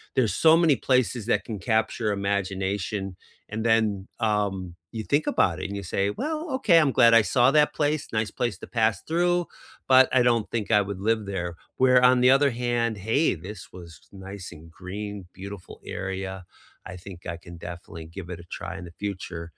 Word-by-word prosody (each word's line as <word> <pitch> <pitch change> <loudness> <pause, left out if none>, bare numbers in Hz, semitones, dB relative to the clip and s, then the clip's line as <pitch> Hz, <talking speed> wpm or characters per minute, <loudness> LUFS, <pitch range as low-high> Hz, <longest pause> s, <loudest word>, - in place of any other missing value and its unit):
there's 120 -5 +2
so 160 0 +6
many 165 -4 +4
places 125 -4 +2
that - - +1
can 105 -4 -5
capture 110 +2 0
imagination, 100 0 -2 0.5
and 110 - -3
then, 115 0 +4 0.4
um, 105 -3 +1 0.4
you 110 - -3
think 145 +2 +2
about - - +2
it, - - -3
and 100 - -6
you - - -7
say, 100 - +1
"Well, 305 - -3 0.2
okay, 175 -10 +5
I'm 150 -3 +3
glad 115 0 +7
I 115 - +8
saw 120 -1 +5
that 150 0 +4
place, 150 0 +1
nice 110 0 0
place 120 -6 0
to - - -9
pass 110 -2 +3
through, 175 +2 +2 0.5
but 130 0 +8
I - - +6
don't 115 -3 0
think 110 -4 -2
I 105 -1 +5
would 100 -2 -5
live 110 -2 +1
there." 95 -3 -3 0.3
Where 125 -1 +5
on 125 -1 +3
the 125 +1 +6
other 140 -1 +3
hand, 120 -2 0
"Hey, 140 +8 +3
this 95 +4 -9
was 90 -2 -10 0.2
nice 95 0 -8
and 80 +1 -14
green, 100 +3 -6 0.2
beautiful 100 0 -9
area. 95 0 -4 0.5
I 95 - -8
think 95 -3 -9 0.2
I 85 - -7
can 85 0 -12
definitely 85 -1 -9
give 95 -3 -6
it 85 - -6
a 85 - -11
try - - -6
in 90 - -8
the 85 - -18
future 90 -4 -4
105 Hz, 195 wpm, -25 LUFS, 95-125 Hz, 0.5 s, I